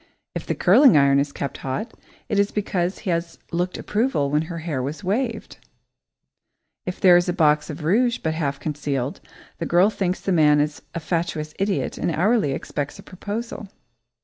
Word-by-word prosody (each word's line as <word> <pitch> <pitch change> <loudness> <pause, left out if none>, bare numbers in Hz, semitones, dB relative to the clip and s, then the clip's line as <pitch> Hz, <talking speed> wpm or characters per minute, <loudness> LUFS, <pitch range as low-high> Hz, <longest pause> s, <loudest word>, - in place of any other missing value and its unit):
If - - -5
the - - -1
curling 235 - +6
iron 140 -1 +5
is 140 0 0
kept 140 - -5
hot, 135 - -4 0.3
it 210 -5 0
is 200 0 +3
because 190 -3 -1
he 190 - -3
has 170 0 -2
looked 180 +1 -1
approval 210 - 0
when 150 +1 +2
her 170 - -5
hair 160 -5 -3
was 145 +9 -5
waved. 225 +3 -2 1.3
If 180 - -4
there 180 -2 +7
is 175 +1 +1
a - - +1
box 150 -3 +2
of 155 0 -6
rouge 230 +9 +2
but 160 - -2
half 140 -4 -2
concealed, 145 -3 -3 0.4
the 165 - -2
girl 180 +5 +4
thinks 185 -3 -1
the 195 - -2
man 150 -4 +5
is 150 0 -1
a - - -1
fatuous 160 -2 -2
idiot 195 0 -1
and - - 0
hourly 185 - +2
expects 145 +1 -4
a - - -12
proposal. 210 +3 -6
170 Hz, 180 wpm, -23 LUFS, 150-200 Hz, 1.3 s, there